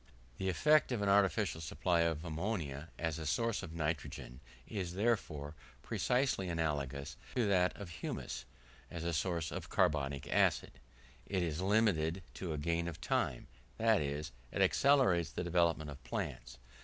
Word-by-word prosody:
The 95 - 0
effect 150 - +4
of 115 -4 0
an 100 - +2
artificial 100 -3 +3
supply 85 +2 +1
of 85 -1 +1
ammonia, 80 -4 -3
as 80 -1 -2
a 80 - -5
source 115 +8 +1
of - - -7
nitrogen, 75 -5 -3 0.3
is, 90 -4 -4
therefore, 90 -9 0 0.3
precisely 125 -7 +1
analogous 70 -4 -2 0.2
to 125 -3 +2
that 90 -2 +3
of 100 -4 -7
humus - - -4 0.4
as 85 -1 -5
a 85 0 -1
source 85 +1 -1
of - - -5
carbonic 70 -1 +1
acid - - +3 0.6
it 95 -3 0
is 80 0 -2
limited 95 -4 +2
to 90 -3 -4
a 75 - -2
gain 85 +3 0
of 80 -2 -5
time; 60 -4 0 0.3
that 110 -2 +4
is, 75 +2 -3 0.2
it - - +2
accelerates 130 - +4
the - - -4
development 85 -3 +1
of 70 - -11
plants. 60 0 -4
85 Hz, 155 wpm, -35 LUFS, 75-100 Hz, 0.6 s, effect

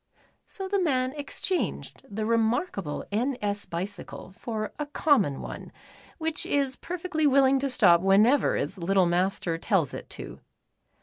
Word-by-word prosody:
So 385 -1 -5
the 400 0 0
man 260 -6 +1
exchanged 300 +5 -2
the 215 +1 -3
remarkable 225 - 0
" - - -37
N. 245 +5 0
S." 205 0 -2
bicycle 185 +2 -6
for 215 -1 -4
a 295 - -2
common 275 - +2
one, - - -8 0.5
which 320 -1 -1
is 275 -2 0
perfectly 345 -3 -2
willing 270 -1 +4
to 275 +1 -1
stop 175 -9 +5
whenever 210 +9 +4
its 195 - -3
little 190 +2 +3
master 175 -1 0
tells 175 - +1
it - - -8
to. - - -7
230 Hz, 145 wpm, -27 LUFS, 195-285 Hz, 0.5 s, stop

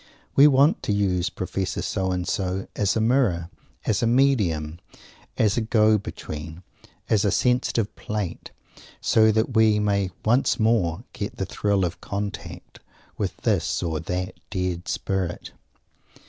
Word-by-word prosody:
We 140 +2 +8
want 140 +3 +4
to - - -2
use 95 -3 +1
Professor - - -3
So 95 -1 -1
and 90 -1 -2
so 95 0 -1
as 100 -2 +1
a - - +1
Mirror, 110 -8 +1 0.3
as 105 - +1
a 115 - +2
Medium, 100 - +2 0.6
as 105 -1 +2
a - - +2
Go 110 -1 +3
Between, 80 -2 -8 0.4
as 105 -3 +2
a 105 - +3
Sensitive 125 -2 +1
Plate, 105 -5 -4 0.5
so 110 0 +4
that 110 +3 0
we 110 -2 +4
may 100 -2 +1 0.2
once 120 +4 +2
more 110 -4 +1
get 100 - -5
the 95 - -2
thrill 100 -1 0
of 85 - -5
contact 100 0 -6 0.4
with - - -2
this - - 0
or 80 -2 -1
that 90 +3 -4
dead 90 -2 -3
Spirit. 95 -3 -3
100 Hz, 145 wpm, -24 LUFS, 90-110 Hz, 0.6 s, We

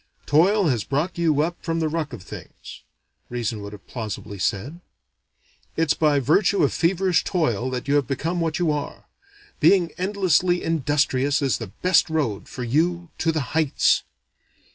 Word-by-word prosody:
"Toil 190 +7 +3
has 120 -6 0
brought 160 +6 -2
you 155 -4 +2
up 170 +2 -4
from 165 -1 -1
the 160 - +1
ruck 155 -1 -3
of 115 -7 -9
things." - - -11 0.5
Reason 115 -3 -3
would 100 0 -7
have 105 -1 -12
plausibly 105 -4 -6
said, 130 - -2 1.0
"it's 160 -2 +2
by 150 -3 +2
virtue 185 - +2
of - - +2
feverish 180 +1 +2
toil 130 - 0
that 130 +1 -4
you 140 - +1
have 145 -4 +2
become 165 +7 -2
what 165 -1 -1
you 175 -4 +1
are. 145 -1 -5 0.5
Being 180 -4 +4
endlessly 185 -2 +1
industrious 145 -3 +1
is 135 - +1
the 115 - -5 0.2
best 180 -2 +4
road 145 -11 -2
for 125 - -6
you 170 +7 0
to 165 - +2
the 155 -2 -1
heights." 155 -3 +2
155 Hz, 165 wpm, -23 LUFS, 130-170 Hz, 1.0 s, Being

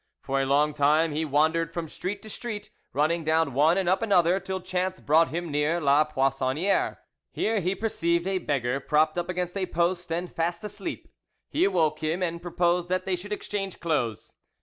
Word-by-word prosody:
For 135 0 0
a 135 - -1
long 145 +2 +3
time 150 +3 +3
he 155 +2 -1
wandered 160 +3 +2
from 165 -1 -4
street 190 +7 -5
to 215 - -9
street, 210 -3 -6 0.2
running 155 +4 +1
down 160 -2 +1
one 155 +7 +4
and 190 -2 0
up 185 +4 +2
another, 185 -4 +3
till 190 0 -4
chance 185 0 -2
brought 160 +3 +4
him 170 0 -4
near 150 +4 +1
La 145 0 +4
Poissonniere. 135 +4 0 0.3
Here 220 0 0
he 185 +1 -1
perceived 170 -6 0
a 190 -1 0
beggar 135 -5 -1
propped 155 +2 +2
against 180 +1 -3
a 190 -2 -1
post 175 0 -1
and 175 +2 -3
fast 170 +2 -2
asleep; 210 - -5 0.4
he 345 - +3
awoke 155 - +1
him, 160 +4 -1
and 170 -1 -2
proposed 175 0 0
that 185 0 0
they 190 - 0
should 195 +4 -9
exchange 200 -2 -4
clothes. 135 -10 -2
170 Hz, 185 wpm, -26 LUFS, 150-185 Hz, 0.4 s, one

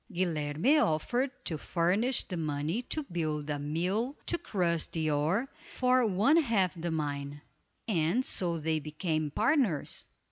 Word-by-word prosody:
Guilerme 170 - +1
offered 240 - 0 0.2
to 160 -3 -1
furnish 195 - +2
the 185 - -6
money 155 +6 -1
to 305 +5 -3
build 155 - -3
a 145 - -2
mill 185 - -1
to 345 - 0
crush 170 - +1
the 160 -2 -1
ore, 160 - +1 0.3
for 255 -1 +3
one 215 - +3
half 225 - +2
the 170 -1 -4
mine; 145 -2 -3 0.5
and 190 +5 +1
so 170 -2 -1
they 160 0 0
became 155 0 -2
partners. 220 - 0
170 Hz, 140 wpm, -30 LUFS, 155-230 Hz, 0.5 s, for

